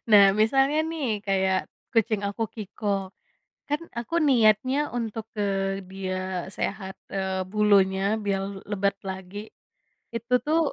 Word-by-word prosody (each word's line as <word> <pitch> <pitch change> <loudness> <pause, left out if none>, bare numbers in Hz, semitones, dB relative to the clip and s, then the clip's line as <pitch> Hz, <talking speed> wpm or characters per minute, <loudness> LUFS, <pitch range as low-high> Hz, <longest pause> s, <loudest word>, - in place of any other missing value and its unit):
Nah, 200 -2 +8
misalnya 270 +8 +3
nih 315 -5 -2 0.2
kayak 190 -1 +2 0.4
kucing 220 -2 +2
aku, 200 +3 -3
Kiko, 210 -1 -7 0.8
kan 295 +2 0 0.2
aku 240 +8 -5
niatnya 255 +4 +4
untuk, 225 -2 -3
eee, 195 -1 -1
dia 185 -1 -3
sehat, 190 0 -4 0.2
eee, 190 -1 -1
bulunya 200 -1 +3
biar 195 -1 +1 0.3
lebat 200 -1 +1
lagi, 190 +1 -6 0.8
itu 235 +2 -3
tuh 315 +2 +3
200 Hz, 120 wpm, -26 LUFS, 190-225 Hz, 0.8 s, Nah